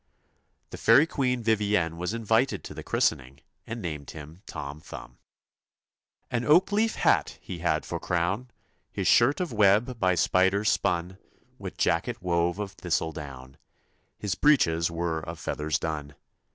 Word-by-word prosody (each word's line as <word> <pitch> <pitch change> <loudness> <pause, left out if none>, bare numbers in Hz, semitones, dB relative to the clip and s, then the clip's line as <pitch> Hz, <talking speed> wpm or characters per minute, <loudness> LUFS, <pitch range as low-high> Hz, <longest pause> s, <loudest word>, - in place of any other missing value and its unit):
The - - -8
fairy 145 - +6
Queen 125 -6 -1
Vivienne 105 -6 +1
was 90 +2 -3
invited 115 +3 +1
to - - -8
the - - -7
christening, 65 +2 -1 0.3
and 110 0 -6
named 75 -5 -5
him 80 +3 -10
Tom 75 -2 -7
Thumb. - - -11 1.1
An 120 -1 0
oak 170 +9 +4
leaf 220 +2 +1
hat - - +2
he 90 - -8
had 80 -2 0
for - - -4
crown; 90 +8 -1 0.4
His - - -2
shirt 125 +5 +4
of 180 -8 -3
web 110 +4 +3
by 95 -3 +2
spiders 95 +5 +2
spun; 90 0 -1 0.4
With - - -7
jacket - - 0
wove 85 0 0
of 105 -2 -4
thistledown; 75 -7 -4 0.6
His 105 -3 -2
breeches 85 - +3
were 85 -1 -2
of 80 +1 -7
feathers 75 0 -2
done. 75 -3 -5
90 Hz, 145 wpm, -27 LUFS, 80-110 Hz, 1.1 s, fairy